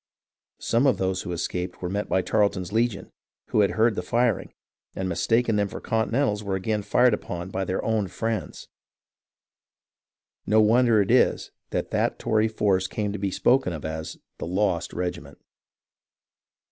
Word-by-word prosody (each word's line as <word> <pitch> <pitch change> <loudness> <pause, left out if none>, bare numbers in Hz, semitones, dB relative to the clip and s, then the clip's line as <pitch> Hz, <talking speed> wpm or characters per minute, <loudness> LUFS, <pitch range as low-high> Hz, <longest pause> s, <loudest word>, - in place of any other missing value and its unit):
Some 120 +5 +2
of 125 -7 +3
those 95 0 -1
who 90 - -6
escaped 90 +1 -3
were - - -1
met 100 +3 -3
by 95 - +2
Tarleton's 100 -3 0
legion, 110 -4 0 0.4
who - - +1
had 100 - +3
heard 110 +1 +4
the 95 - -3
firing, 120 +3 0 0.4
and 95 - -2
mistaken 115 +6 +1
by - - +1
them 100 -1 +1
for - - -7
Continentals 110 -1 0
were 100 -2 -2
again 105 +3 -1
fired 125 +3 +3
upon 90 -3 -4
by 95 0 -2
their 95 - -2
ozvnfriettds. 110 +1 -2 1.8
No 110 - +4
wonder 110 0 +4
is 95 - -7
it - - +3 0.2
that - - -3
that - - 0
Tory 110 0 +1
force 100 -4 +1
came 105 0 -3
to 105 - -4
be 100 0 -1
spoken 120 0 +2
of 80 -2 -6
as 80 0 -5 0.2
"the - - -4
lost 90 -1 0
regiment." 90 0 -5
105 Hz, 160 wpm, -25 LUFS, 95-110 Hz, 1.8 s, heard